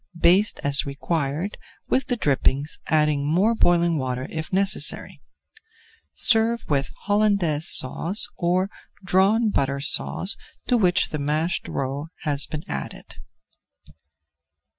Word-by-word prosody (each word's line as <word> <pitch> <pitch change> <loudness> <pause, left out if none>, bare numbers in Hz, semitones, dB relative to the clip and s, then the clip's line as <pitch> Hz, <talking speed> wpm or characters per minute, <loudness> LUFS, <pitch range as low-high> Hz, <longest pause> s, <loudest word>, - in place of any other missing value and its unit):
Baste 190 +6 +3
as 140 -1 +3
required 145 +5 -3 0.3
with 265 - 0
the 250 - 0
drippings, 140 - 0
adding 150 -2 +1
more 180 +10 +2
boiling 175 -6 +2
water 130 -1 -3
if 160 -1 -6
necessary. 195 +1 +1 0.9
Serve 230 0 +2
with 140 -2 0
Hollandaise 200 -7 +1
Sauce 170 +10 +4
or 185 +3 0 0.3
Drawn 195 +5 +2
Butter 140 -3 -1
Sauce 185 +7 0 0.3
to 250 - +1
which 185 -5 +2
the 150 - -4
mashed 155 +4 -2
roe 140 +3 -4 0.2
has 145 -2 +1
been 155 -1 -6
added. 70 -1 -7
165 Hz, 115 wpm, -23 LUFS, 145-200 Hz, 0.9 s, Sauce